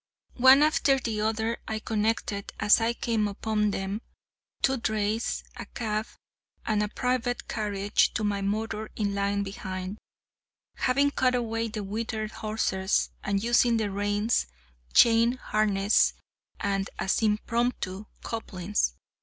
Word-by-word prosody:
One 260 +3 +8
after 290 -3 +3
the 225 -5 -2
other, 220 +2 0
I 220 - -2
connected, 215 -2 -1
as 210 - +5
I 230 +1 +1
came 225 -3 0
upon 210 +1 0
them, 195 +2 -3 0.6
two 265 0 +3
drays, 220 0 -1
a - - -7
cab, 215 -1 -2 0.6
and 215 -1 +1
a 210 - +1
private 250 0 -1
carriage, 205 -2 +1
to 220 - 0
my 205 -1 0
motor 215 +2 -2
in 205 -2 -1
line 200 0 0
behind, 190 0 -6 0.8
having 280 +2 +2
cut 255 -2 +2
away 230 -1 -1
the 215 -1 -5
withered 215 +1 -3
horses, 205 -3 0
and 200 0 0
using 240 0 +4
the 215 -2 -1
reins, 205 - 0 0.4
chain 230 0 +5
harness, 210 -4 +2 0.4
&c., 195 -1 0
as 190 - +1
impromptu 215 -2 0 0.2
couplings. 195 - -2
215 Hz, 130 wpm, -27 LUFS, 200-230 Hz, 0.8 s, One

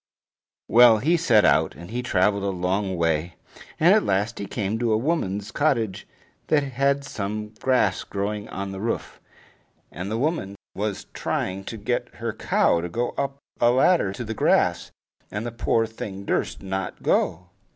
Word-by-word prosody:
Well, 120 -1 +7
he 155 +11 +2
set 120 -11 +4
out, - - +3
and 85 +6 -11
he 125 +2 -2
traveled 100 -3 +2
a 100 - 0
long 95 +1 -1
way, 85 0 0 0.4
and 170 +5 +6
at 215 - +4
last 100 +4 0
he 100 - -4
came 105 0 -2
to 120 -2 +1
a 110 - +3
woman's 105 - -1
cottage 120 -10 0 0.4
that 150 -2 +3
had 140 +1 0
some 105 -2 -4
grass 125 -7 +2
growing 105 +1 -4
on 100 0 -5
the 95 - -6
roof. 115 +3 -3 0.7
And 90 +3 -5
the 110 - -1
woman 135 - -1 0.2
was 105 -1 -3
trying 95 +1 -2
to 115 - -6
get 110 +4 -2
her - - -3
cow 85 - +2
to 85 - -4
go 120 +7 -1
up 140 0 -3 0.2
a 120 - +5
ladder 130 - +3
to 120 - -5
the 110 -1 -4
grass, - - +2 0.4
and 105 +2 -4
the 120 - -3
poor 115 0 +1
thing 100 -3 -7
durst - - -1
not 95 0 -4
go. 90 +2 +1
105 Hz, 170 wpm, -24 LUFS, 95-120 Hz, 0.7 s, Well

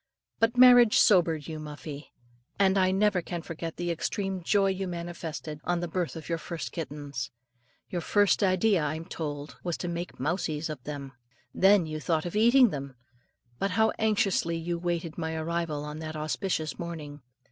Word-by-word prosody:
But 225 +2 +2
marriage 245 -3 +8
sobered 165 -6 +4
you, 160 -1 -5
Muffie; 150 -1 -8 0.5
and 195 -1 +4
I 185 -1 +4
never 195 0 +2
can 170 -1 -5
forget 165 -1 -6
the 175 0 -1
extreme 190 +3 -2
joy 195 +3 +3
you 190 0 -3
manifested 170 -3 -6
on 175 -1 0
the 175 - -2
birth 175 0 -2
of 160 - -8
your 165 -1 -1
first 165 -1 -5
kittens. 145 -5 -5 0.6
Your 175 - -3
first 205 +3 +3
idea, 190 0 +3
I'm 155 +2 -3
told, 150 -4 -6
was 175 -2 -2
to 175 - -4
make 175 +1 -5
"mousies" 155 +1 -1
of 140 -5 -8
them; 140 -2 -6 0.4
then 195 -2 +5
you 155 0 -4
thought 160 +1 0
of 175 - -5
eating 240 +2 +6
them. 140 -2 -6 0.6
But 195 - +1
how 220 0 +4
anxiously 205 -6 +1
you 170 +1 -3
waited 170 -1 -3
my 160 -1 -2
arrival 160 -2 -2
on 150 +1 -6
that 160 0 -6
auspicious 155 0 -2
morning. 155 -4 -6
170 Hz, 170 wpm, -28 LUFS, 155-190 Hz, 0.6 s, marriage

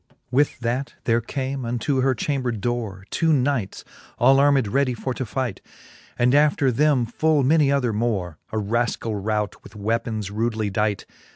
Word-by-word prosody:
XXIX. - - -31
With 140 +3 +2
that 125 +4 -2
there 115 0 +2
came 135 +2 -4
unto 120 +3 -1
her 130 0 +2
chamber 130 0 -1
dore 110 -3 -3
Two 165 -1 +2
knights, 130 -8 0 0.3
all 135 +3 +5
armed 140 -4 +4
ready 130 +2 +1
for 130 +3 -3
to 130 -1 -4
fight. 120 -4 -3 0.6
And 125 +1 +3
after 145 -2 +3
them 140 -1 +2
full 150 +5 +1
many 145 +1 +4
other 125 -5 +1
more, 100 -7 -2
A 110 - -2
raskall 110 -1 -1
rout, 105 -1 -2
with - - -14
weapons 110 -1 -2
rudely 110 -1 -1
dight. 105 +1 -1
120 Hz, 165 wpm, -23 LUFS, 110-135 Hz, 0.6 s, all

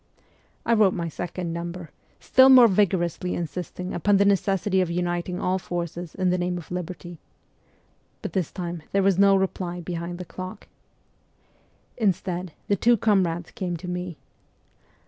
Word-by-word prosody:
I 235 - +3
wrote 210 -4 +4
my 170 -2 -2
second 175 +1 -4
number, 170 -1 -6 0.3
still 260 +1 +6
more 255 -3 +9
vigorously 180 -3 +1
insisting 180 +2 -5
upon 200 +4 +3
the 200 - +4
necessity 195 -1 +2
of 180 - 0
uniting 175 +1 -2
all 185 +1 0
forces 175 -1 -5
in 185 -1 +1
the 180 - +1
name 180 0 -1
of 175 - -10
liberty. 175 -1 -6 1.0
But - - -5
this 185 -6 -1
time 175 -2 -5
there 195 0 +3
was 195 -1 +3
no 200 0 +6
reply 185 -2 -1
behind 175 0 -5
the 180 - -7
clock. 185 +4 -8 1.3
Instead 185 -4 -1 0.2
the 200 - +3
two 235 +5 +4
comrades 185 -6 +1
came 175 -2 -3
to 180 +3 -9
me. 180 -2 -4
180 Hz, 150 wpm, -25 LUFS, 175-195 Hz, 1.3 s, more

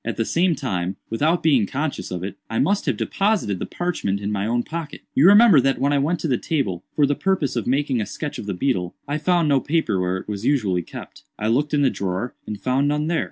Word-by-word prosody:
At 115 - -4
the 115 - 0
same 170 +4 +2
time, 95 -9 -2 0.2
without 155 +9 +1
being 135 -10 +3
conscious 145 +5 -3
of 90 -1 -4
it, 100 - -5
I 115 - -2
must 200 +1 +1
have - - +1
deposited 195 - 0
the - - -4
parchment 165 - -2
in 100 +1 -3
my 100 0 -1
own 120 +1 0
pocket. 160 0 -6
"You 145 +6 +5
remember 205 - +7
that 135 +1 +1
when 140 +1 +1
I 140 - +3
went 160 +5 0
to - - -1
the 125 -5 +1
table, 100 - -2
for 145 - +4
the 145 - +1
purpose 175 -5 0
of 120 - -2
making 135 -2 +1
a 105 - -3
sketch 150 -2 -5
of 105 - -7
the 100 - -2
beetle, 90 -5 -1
I 145 +2 -2
found 170 0 +2
no 140 -2 +4
paper 155 - 0
where 90 +1 0
it - - -9
was 105 -1 -5
usually 110 -10 +1
kept. - - -10 0.2
I 110 - -1
looked 145 +6 +1
in 145 - +2
the 135 - +3
drawer, 95 +5 -3
and 105 -1 -5
found 130 +2 +1
none 150 +1 0
there. 170 - +1
135 Hz, 250 wpm, -22 LUFS, 105-155 Hz, 0.2 s, remember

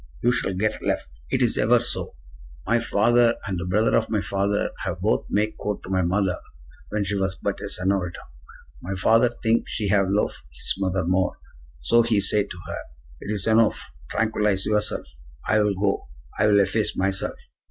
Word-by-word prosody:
You 120 - +4
shall 95 -6 -1
get 105 +3 -1
left. - - -2 0.2
It - - +1
is - - +2
ever - - +5
so. - - -2 0.5
My 115 +3 +2
father 120 +2 +3
and 95 -2 -2
the 90 - -4
brother 105 +5 +2
of 110 - +1
my 110 - +1
father 100 +1 0
have - - -3
both - - 0
make 105 +1 0
court 105 0 -3
to 95 - -7
my 95 -1 +2
mother 90 +1 +1 0.5
when 105 -1 -1
she 100 +1 -2
was 95 -1 0
but 100 0 -3
a 100 - -4
senorita. 90 -2 -1 0.6
My 95 +2 -4
father 115 +6 +4
think 115 0 +2
she 105 -3 -2
have 100 -1 +3
lofe 100 -8 0
his - - -1
brother 95 -2 0
more. 90 +1 +1 0.4
So 115 - +4
he 115 -3 +2
say 100 +1 +1
to 90 - -9
her: - - -4 0.4
'It 100 - -5
is 100 -3 -1
enofe; 110 0 +4 0.3
tranquillize 105 -3 +1
yourself. 105 0 0 0.4
I 105 0 +4
will 105 -1 +1
go. 100 -1 0 0.3
I 105 - +4
will 100 -1 +5
efface 100 +2 0
myself. 95 0 -1
100 Hz, 185 wpm, -24 LUFS, 95-110 Hz, 0.6 s, ever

